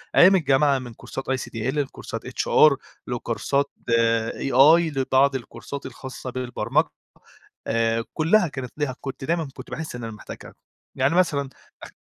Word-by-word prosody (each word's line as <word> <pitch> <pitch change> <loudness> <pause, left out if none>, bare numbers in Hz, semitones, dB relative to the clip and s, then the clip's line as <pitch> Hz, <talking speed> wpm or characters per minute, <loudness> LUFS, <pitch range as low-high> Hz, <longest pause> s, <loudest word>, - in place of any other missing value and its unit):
أيام 190 +2 +8
الجامعة 140 -3 +3
من 120 -2 -9
كورسات 135 +4 -7
ICDL 130 -3 -3 0.2
لكورسات 140 -2 -4
HR 155 -2 +4 0.3
لكورسات 125 +3 -1 0.6
AI 155 +6 +5
لبعض 135 +1 +3
الكورسات 140 +2 -7
الخاصة 130 0 -7
بالبرمج 125 -1 0 0.8
آآ 115 0 +1
كلّها 175 +4 +3
كانت 130 -4 -7
ليها 140 -4 -2
كُنت 135 -1 -6
دايمًا 165 -1 0
كُنت - - -11
باحسّ 160 -5 -5
إن 120 - -7
أنا 115 -1 -5
محتاجها 105 - -10 0.4
يعني 135 +6 +2
مثلًا، 140 -7 +2 0.3
اخ - - -11
135 Hz, 135 wpm, -24 LUFS, 125-150 Hz, 0.8 s, أيام